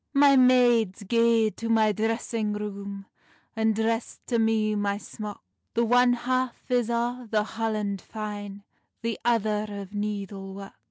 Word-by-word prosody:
"My 280 0 +6
maids, 245 -6 +4
gae 230 +1 +3
to 230 +2 -6
my 220 -1 +4
dressing 220 0 -1
room, 200 -1 -6 0.5
And 220 -1 +2
dress 225 +1 -1
to 235 -2 0
me 220 -1 +2
my 205 -1 0
smock; 210 0 -8 0.3
The 235 +1 +3
one 245 +1 +5
half 255 +1 -2
is 245 -2 +2
o 240 +1 -1
the 215 -1 +2
holland 215 -3 -2
fine, 205 -2 -7 0.4
The 230 -1 -2
other 215 -2 +1
o 200 -1 -6
needle 200 -2 -4
work." 195 0 -9
220 Hz, 145 wpm, -26 LUFS, 205-235 Hz, 0.5 s, My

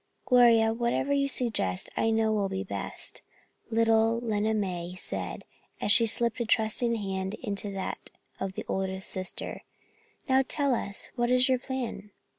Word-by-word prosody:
"Gloria, 230 -3 +5
whatever 240 +4 0
you 280 0 +2
suggest, 220 - -1
I 225 - +1
know 220 0 +2
will 200 -2 0
be 190 0 -3
best," 200 - -5 0.5
little 225 0 +3
Lena 220 -2 0
May 180 -4 -3
said, - - -5 0.4
as - - +2
she 230 +2 +7
slipped 235 +2 +3
a 235 - 0
trusting 225 +2 +2
hand 195 -1 -3
into 205 -3 -4
that 190 -1 -5 0.3
of 190 0 -3
the - - -6
oldest 190 0 -3
sister. 185 -1 -5 0.7
"Now, 265 -1 +4
tell 280 -3 +1
us, 200 -4 -4
what 240 -1 0
is 255 +1 +4
your 260 -1 +2
plan?" 245 -6 -5
225 Hz, 155 wpm, -28 LUFS, 195-240 Hz, 0.7 s, she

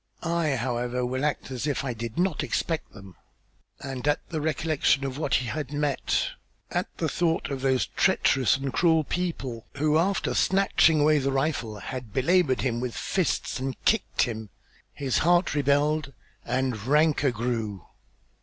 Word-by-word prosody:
I, 165 -4 +1
however, 125 0 -1
will 130 +2 -2
act 150 -2 -1
as 130 +2 -3
if 145 - -1
I 130 -3 -2
did 115 0 -6
not 180 -3 +1
expect 165 -2 -2
them." 95 -4 -13 0.7
And 135 -1 -5
at 145 - 0
the 160 -3 -3
recollection 155 -2 +1
of 135 +1 -4
what 145 -5 +1
he 125 - +1
had 145 +2 -4
met 145 -2 0 0.4
at - - -1
the - - 0
thought 165 -3 0
of 135 -1 -3
those 130 -1 +2
treacherous 130 -2 +2
and 135 -1 -4
cruel 160 -2 +3
people 140 -9 -3
who, 155 +2 +2
after 195 +4 0
snatching 190 -5 +3
away 150 0 +4
the 135 0 0
rifle, 135 -6 -1
had 120 +1 -7
belabored 145 0 +2
him 120 -3 -1
with 125 -1 -4
fists 185 -7 -1
and 130 0 -3
kicked 225 - +2
him, 110 -3 -4 0.4
his 135 -3 -1
heart 175 +2 +3
rebelled 145 +1 +1 0.3
and 125 -3 -1
rancor 150 0 +3
grew. 115 -5 -3
135 Hz, 160 wpm, -26 LUFS, 125-155 Hz, 0.7 s, away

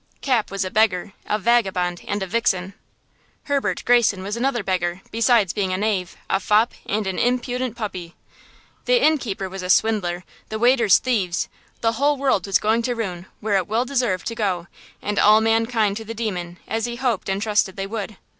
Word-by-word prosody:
Cap 250 -6 +1
was 195 -1 -2
a 185 - -5
beggar, 200 -3 +1
a 210 - +1
vagabond 190 -6 +1
and 205 -1 -1
a - - -2
vixen. 190 -2 0 0.7
Herbert 285 -2 -1
Greyson 230 -6 +3
was 205 +3 -3
another 240 -2 0
beggar, 180 -1 -1
besides 230 -4 +3
being 195 -3 -1
a 185 - 0
knave, 195 -3 -1
a 195 - +1
fop 215 +4 +2
and 210 +1 -1
an 190 -1 -2
impudent 250 0 -1
puppy. 185 -7 -6 0.7
The - - +4
innkeeper 245 - +1
was 190 0 -7
a 180 - -5
swindler, 185 -4 +2 0.3
the 220 - -3
waiters 235 -3 +5
thieves, 195 -9 -1 0.3
the 225 - +2
whole 285 +5 +1
world 260 -9 +1
was 195 - +4
going 220 +2 +1
to 245 +1 -1
ruin, 185 -5 -4
where 205 -2 +1
it 185 - -1
well 225 +4 0
deserved 245 -9 0
to 230 - -2
go, 190 -6 -1 0.4
and 210 0 -1
all 215 +1 +6
mankind 225 -2 +1
to 225 - -6
the 225 +1 -7
demon–as 205 0 -3
he 240 0 -4
hoped 240 -6 -1
and 195 0 0
trusted 210 -2 +1
they 195 - -3
would! 210 -1 -5
215 Hz, 185 wpm, -22 LUFS, 190-235 Hz, 0.7 s, all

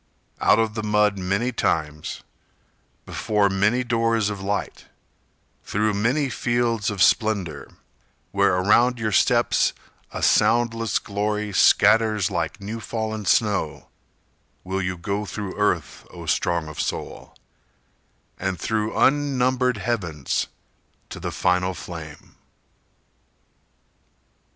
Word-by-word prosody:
Out - - +4
of 110 -1 +1
the 110 - -3
mud 105 -1 +2
many 100 +7 0
times 75 -9 -2 0.8
Before 105 -2 +1
many 105 +6 +2
doors 115 -3 +1
of 100 -2 -6
light 100 +1 -3 0.8
Through 105 +1 0
many 125 +8 +1
fields 120 -4 0
of 100 -5 +1
splendor, 100 -9 +1 0.6
Where - - +3
around 110 +7 +3
your 110 -2 -2
steps 95 - +3 0.4
a - - -5
soundless 115 0 +2
glory 105 0 -2
scatters 110 0 +4
Like 80 -3 -2
new 105 +3 -6
fallen 110 -1 -4
snow, 100 -6 0 0.7
Will 95 +1 -2
you 90 0 -3
go 100 +4 -3
through 100 0 -5
earth, 90 -7 -1
O - - -10
strong 85 -2 0
of 75 - -5
soul, - - -5 1.0
And 95 -2 -2
through 110 +4 -2
unnumbered 130 -3 +2
heavens 90 - -2 0.6
To - - -8
the - - -4
final 90 +1 +1
flame! 80 -4 -10
105 Hz, 110 wpm, -23 LUFS, 95-115 Hz, 1.0 s, Out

